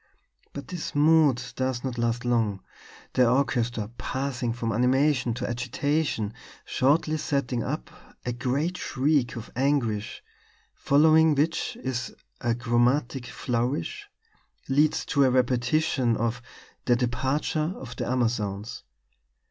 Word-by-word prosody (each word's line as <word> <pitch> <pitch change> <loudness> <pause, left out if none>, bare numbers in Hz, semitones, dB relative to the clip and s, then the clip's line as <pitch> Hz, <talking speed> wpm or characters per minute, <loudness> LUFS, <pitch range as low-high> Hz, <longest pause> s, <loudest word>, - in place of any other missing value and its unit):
But 140 - -8
this 175 -4 -5
mood 145 -4 +4
does 130 -2 -2
not 125 -3 -3
last 120 +1 -1
long; 110 -5 +1 0.5
the 125 -2 +4
orchestra, 120 -4 0
passing 130 -3 -2
from 115 -1 -2
animation 130 +2 +2
to 125 - -3
agitation, 125 -1 -1 0.3
shortly 155 +4 +2
setting 140 -5 -1
up 60 - -4 0.3
a 125 - -1
great 140 +9 -1
shriek 135 -2 +1
of 115 -2 -8
anguish; 125 -6 0 0.5
following 155 +2 +4
which 155 +4 0 0.6
a 120 -1 +1
chromatic 120 +2 +1
flourish 140 - -2 0.6
leads 145 +3 +2
to 140 - +2
a 130 - +5
repetition 125 0 +1
of 115 +1 -1 0.4
'The 120 - +4
Departure 130 +6 0
of 125 -2 -9
the - - -3
Amazons.' 115 -4 -1
125 Hz, 115 wpm, -26 LUFS, 120-145 Hz, 0.6 s, a